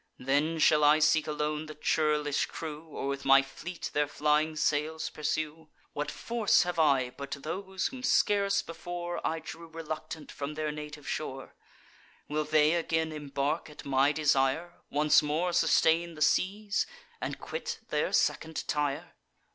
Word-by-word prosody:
Then, 145 +5 +1
shall 155 -1 +4
I 150 +1 +7
seek 155 0 +3
alone 150 0 -2
the 155 - -8
churlish 150 -1 +1
crew, 155 0 -7
Or 145 - -5
with 140 0 -3
my 135 0 +6
fleet 165 +6 -7
their 150 0 +2
flying 150 +2 +1
sails 155 +1 0
pursue? 155 +1 -3 0.2
What 145 0 -2
force 230 -3 +2
have 175 -1 -3
I 135 -5 +3
but 140 +2 -6
those 190 +3 -3
whom 260 -1 -3
scarce 200 -6 +2
before 175 +1 -5
I 160 - 0
drew 165 +1 -9
reluctant 160 -1 -6
from 145 +1 -5
their 155 0 -2
native 150 -1 -8
shore? 135 -3 -4 0.7
Will 150 +1 -1
they 155 +1 +4
again 160 -1 0
embark 145 +1 -2
at 150 - -11
my 140 +1 +3
desire, 150 +2 +1 0.2
Once 150 +1 +4
more 160 +4 0
sustain 170 -1 +3
the 155 - +1
seas, 205 +6 +1 0.3
and - - -3
quit 480 -1 -5
their - - 0
second 160 0 0
Tyre? 145 -2 -1
155 Hz, 150 wpm, -30 LUFS, 150-165 Hz, 0.7 s, I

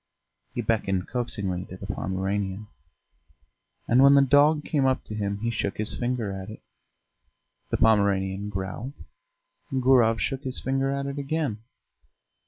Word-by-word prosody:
He 120 - -1
beckoned 100 -4 0
coaxingly 100 -7 -2
to 95 - -10
the 100 - -8
Pomeranian, 95 +1 -2 1.2
and 125 +3 +5
when 140 +1 +8
the 140 - +7
dog 145 +3 +4
came 145 -4 +1
up 130 - +1
to - - -8
him 100 -1 -2
he 115 +1 0
shook 100 -3 -2
his 110 +1 -2
finger 120 -4 -2
at 95 0 -6
it. 110 - -11 1.1
The - - 0
Pomeranian 100 -2 +2
growled: 95 +7 -5 0.8
Gurov 125 -4 +4
shook 135 -1 -2
his 130 -2 -3
finger 135 +1 0
at 140 0 -2
it 140 +1 -4
again. 140 -6 -2
115 Hz, 145 wpm, -26 LUFS, 100-135 Hz, 1.2 s, when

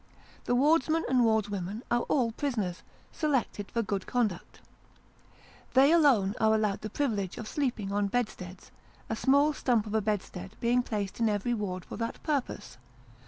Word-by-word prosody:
The 245 - +1
wardsmen 315 +4 +3
and 255 -1 +2
wardswomen 210 -1 0
are 240 0 +3
all 245 -5 +2
prisoners, 220 -9 -2 0.3
selected 265 -9 -1
for 230 - -1
good 200 -2 -3
conduct. 225 -8 -2 1.2
They 270 +3 +6
alone 265 - +4
are 220 0 +4
allowed 210 -2 0
the 215 - -5
privilege 210 -8 -2
of 220 - -6
sleeping 240 -9 -2
on 205 0 +1
bedsteads; 200 -5 -4 0.4
a - - 0
small 280 +6 +3
stump 240 -6 +1 0.2
bedstead 195 -2 -3
being 240 +1 +2
placed 205 -4 -4
in 225 -1 +3
every 210 +3 0
ward 190 -5 -3
for - - -8
that 230 0 -3
purpose. 285 - -3
225 Hz, 150 wpm, -29 LUFS, 200-255 Hz, 1.2 s, They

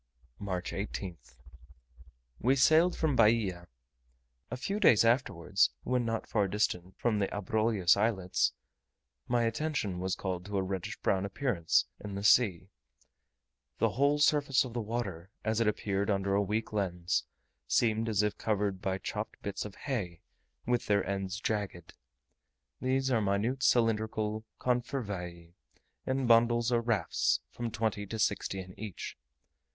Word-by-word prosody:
March 95 -3 -3
18th. 90 - -6 1.0
We 130 +4 +3
sailed 160 +6 +4
from 155 -4 +1
Bahia. 105 -7 +2 0.8
A 125 - -4
few 195 +11 -2
days 115 - +6
afterwards, 100 -6 +2
when 125 -1 0
not 115 -1 -2
far 105 -3 +1
distant 95 -2 -1
from 110 -3 +1
the 100 - +1
Abrolhos 105 -2 +2
Islets, 100 -3 +1 0.7
my 120 -1 +2
attention 115 - -1
was 95 0 -1
called 90 -2 -3
to 100 0 -3
a 95 - +1
reddish 95 -1 -4
brown 95 0 +1
appearance 100 -4 +1 0.2
in 100 -1 -5
the 100 - -4
sea. 100 -4 +4 1.1
The - - +2
whole 140 +2 +2
surface 145 -3 +3
of 120 - -8
the 120 - -2
water, 105 -6 -4 0.2
as 110 0 +1
it 115 - +2
appeared 100 -1 -1
under 100 -1 +1
a 100 - +3
weak 105 +3 -2
lens, 90 -10 -1 0.4
seemed 115 0 +2
as 105 -2 +2
if 105 - -1
covered 100 -3 -1
by 95 0 -1
chopped 105 +2 -5
bits 100 0 -3
of 105 - -8
hay, 100 - -3 0.4
with 120 0 0
their 100 -2 +2
ends 95 0 -3
jagged. 100 -6 -3 0.9
These 130 +1 +1
are 115 -3 +3
minute 105 +6 0
cylindrical 110 -2 +1
confervae, 100 -9 -3 0.5
in 130 0 0
bundles 120 0 +4
or 120 -1 +3
rafts 115 -3 +1
of - - -28
from 120 -1 -3
twenty 110 -2 -2
to 110 - -5
sixty 100 -2 0
in 90 -1 -8
each. 105 -3 -6
105 Hz, 145 wpm, -31 LUFS, 95-120 Hz, 1.1 s, days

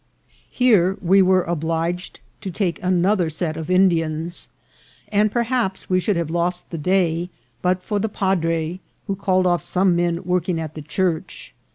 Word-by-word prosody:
Here 205 -7 +3
we 195 +2 +4
were 185 -1 +4
obliged 165 +2 -3 0.2
to 195 - -4
take 180 0 -2
another 185 -1 +2
set 160 0 -3
of 160 +1 -6
Indians, 170 -3 +1 0.6
and 210 0 +2
perhaps 235 -6 -1
we 185 - +4
should 200 +2 0
have 170 -2 -2
lost 175 +1 -1
the 165 - -4
day 175 0 +1 0.3
but 180 0 0
for 210 +1 -1
the 220 +2 -1
padre, 170 -4 -1 0.3
who 195 - -2
called 185 -1 +1
off 175 -1 +2
some 185 -1 +2
men 170 0 0
working 180 -1 0
at 155 -1 -5
the 155 - -7
church. 165 +2 -3
180 Hz, 160 wpm, -21 LUFS, 165-190 Hz, 0.6 s, we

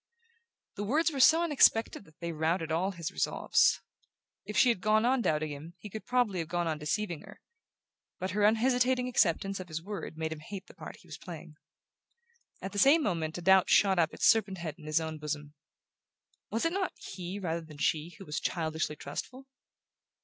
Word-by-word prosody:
The 205 - -2
words 305 +10 +2
were 280 - -4
so 320 +6 +6
unexpected 245 -10 +3
that 160 +1 -22
they 170 0 -3
routed 160 +1 -1
all 175 +4 +1
his 170 -3 -5
resolves. - - +2 0.6
If - - -5
she 255 - +6
had 230 -6 0
gone 215 +2 +3
on 255 +1 +2
doubting 155 -6 0
him 155 +4 -9
he 210 - -10
could 220 - -8
probably 245 -7 +1
have 165 - -3
gone 175 +1 -1
on 155 -2 -2
deceiving 170 +2 -2
her; - - -14 0.8
but 185 0 -3
her 205 +2 0
unhesitating 250 +3 +3
acceptance 195 -4 +1
of 185 - -7
his 160 -1 -4
word 195 -3 -7
made 160 0 -3
him 155 - -10
hate 190 +4 -8
the - - -16
part - - -9
he - - -21
was - - -9
playing. - - -10 1.1
At 195 - -4
the 205 - -2
same 290 +8 +6
moment 160 - -2
a 175 - -7
doubt 190 0 +5
shot 195 -3 +4
up 160 -2 +2
its - - -2
serpent 215 -4 +3
head 170 -3 -5
in 155 - -12
his 155 +1 +2
own 160 -1 -5
bosom. 150 -1 -5 1.0
Was 225 +7 -1
it 330 - +1
not 385 -1 -1
he 185 0 -7
rather 170 -4 -2
than 155 -2 -13
she 160 +3 -1
who 195 - -11
was 150 -2 -3
childishly 160 -2 -2
trustful? 250 - -7
185 Hz, 200 wpm, -30 LUFS, 160-220 Hz, 1.1 s, so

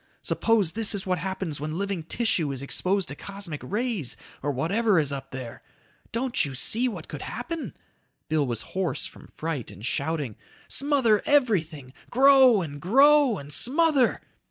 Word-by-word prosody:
Suppose 220 -7 +1
this 220 0 0
is 195 - -3
what 180 -2 0
happens 190 -4 -4
when 155 +2 -4
living 200 -2 -2
tissue 165 -3 -1
is 135 0 -5
exposed 185 +6 +1
to 140 - -5
cosmic 195 -4 -5
rays 210 - -2 0.2
or 145 - -2
whatever 195 - +1
is 145 -3 +2
up 140 -1 -5
there. 130 -3 -8 0.5
Don't 245 +2 0
you 140 -3 -4
see 225 - +3
what 235 - -6
could - - -7
happen?" 335 -2 -5 0.5
Bill 155 -3 +1
was 120 -3 -2
hoarse 185 -2 -1
from - - -12
fright 155 -7 -4
and 100 +5 -10
shouting. 140 -2 -2 0.3
"Smother 270 -7 +2
everything, 165 - +1 0.2
grow 260 -5 +6
and 145 -3 -7
grow 275 +3 +5
and 145 -1 -8
smother 285 - +2
190 Hz, 155 wpm, -26 LUFS, 145-235 Hz, 0.5 s, grow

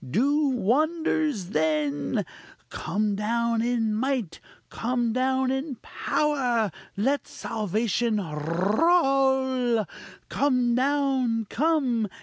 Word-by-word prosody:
do 285 - +2
wonders 285 - 0
then! 155 - 0 0.5
come 210 +2 -1
down 230 +2 0
in 230 -2 0
might! 240 - -2 0.3
come 240 -1 -1
down 260 +1 +1
in 265 +1 -3
power! 250 -8 0 0.3
let 270 +7 0
salvation 220 +1 -1
roll! 250 - +1 0.4
Come 250 -4 +1
down! 260 -3 +1
_come! 270 -9 +1
240 Hz, 85 wpm, -26 LUFS, 215-270 Hz, 0.5 s, do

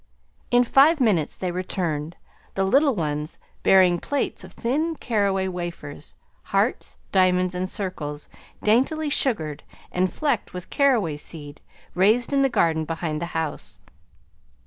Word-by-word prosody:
In 245 0 +5
five 285 +6 +5
minutes 195 - +1
they 180 -1 -2
returned, 175 -3 -3 0.4
the 195 - +1
little 275 +7 +3
ones 150 -2 -3 0.2
bearing 185 -2 +5
plates 285 +9 -2
of - - -12
thin 310 +8 -1
caraway 200 -7 0
wafers, 175 -5 -6 0.3
hearts, - - -1
diamonds, 185 -1 +3
and 185 +1 -3
circles 150 -8 -4 0.4
daintily 280 +8 +2
sugared, 160 - +1 0.3
and 185 +1 0
flecked 280 -11 -1
with 180 0 -8
caraway 230 - +2
seed 145 -1 -7 0.3
raised 220 +8 +3
in 275 - +3
the 270 - +3
garden 160 -9 +1
behind 160 -1 -3
the 170 - -2
house. 105 - -4
185 Hz, 130 wpm, -24 LUFS, 160-245 Hz, 0.4 s, In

